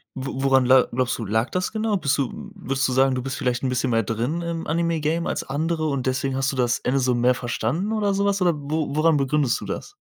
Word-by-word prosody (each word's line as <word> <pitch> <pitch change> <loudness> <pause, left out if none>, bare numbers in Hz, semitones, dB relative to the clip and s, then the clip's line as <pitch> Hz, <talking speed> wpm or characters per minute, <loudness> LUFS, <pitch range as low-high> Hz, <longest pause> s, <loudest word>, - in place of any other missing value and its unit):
wo 135 0 -4
woran 135 -2 +4
la 130 0 +5
glaubst 125 +1 0
du, 115 - -3
lag 110 +4 0
das 185 0 -1
genau? 220 -1 0
Bist 140 -6 0
du 135 -3 -4
würdest 135 +1 -1
du 130 - -2
sagen, 135 0 +3
du 125 - -2
bist 135 +1 -4
vielleicht 125 0 -1
'n 130 - 0
bisschen 125 0 0
mehr 115 0 +3
drin 120 - -2
im 170 -1 -4
Anime-Game 165 0 0
als - - -2
andere 155 +3 -2
und 135 -3 -2
deswegen 130 +1 -1
hast 135 +1 0
du - - -6
das 120 -2 +1
Ende 135 +2 0
so 125 -1 +2
mehr 120 +1 +3
verstanden 130 - -2
oder 205 -2 +1
sowas 200 -1 +1
oder 175 -2 +3
wo 150 0 -3
woran 155 0 +3
begründest 140 -2 +1
du - - -6
das? 405 - -6
135 Hz, 245 wpm, -23 LUFS, 125-165 Hz, -, la